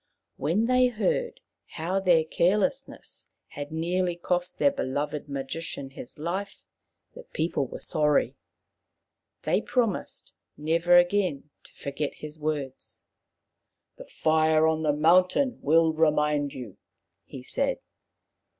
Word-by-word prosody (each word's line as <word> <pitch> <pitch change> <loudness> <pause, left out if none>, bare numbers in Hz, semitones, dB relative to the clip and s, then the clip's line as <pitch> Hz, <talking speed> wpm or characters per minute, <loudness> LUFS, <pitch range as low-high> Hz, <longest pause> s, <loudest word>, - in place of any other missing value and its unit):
When 200 +8 +1
they 255 +1 +4
heard 475 - -1 0.3
how 175 +4 -2
their 175 -4 +4
carelessness 210 - -1 0.2
had 145 +1 -7
nearly 175 +2 -1
cost 180 +1 -2
their 280 - +4
beloved 145 - -3
magician 140 0 -5
his 125 - -10
life, 185 +6 -4 0.5
the - - -10
people 160 - -2
were - - -8
sorry. 150 -1 +1 1.1
They - - +1
promised 235 -6 -2 0.2
nevei 170 +3 +4
again 175 -6 0
to - - -17
forget 140 +1 -4
his 155 +1 -9
words. 145 -4 -4 0.5
" - - -56
The - - -10
fire 155 0 +2
on 160 0 +1
the 155 -2 +2
mountain 180 - +3
will 160 +2 +4
remind 150 -2 +2
you," 120 -7 -8 0.5
he - - -10
said. - - -1
160 Hz, 120 wpm, -27 LUFS, 150-185 Hz, 1.1 s, they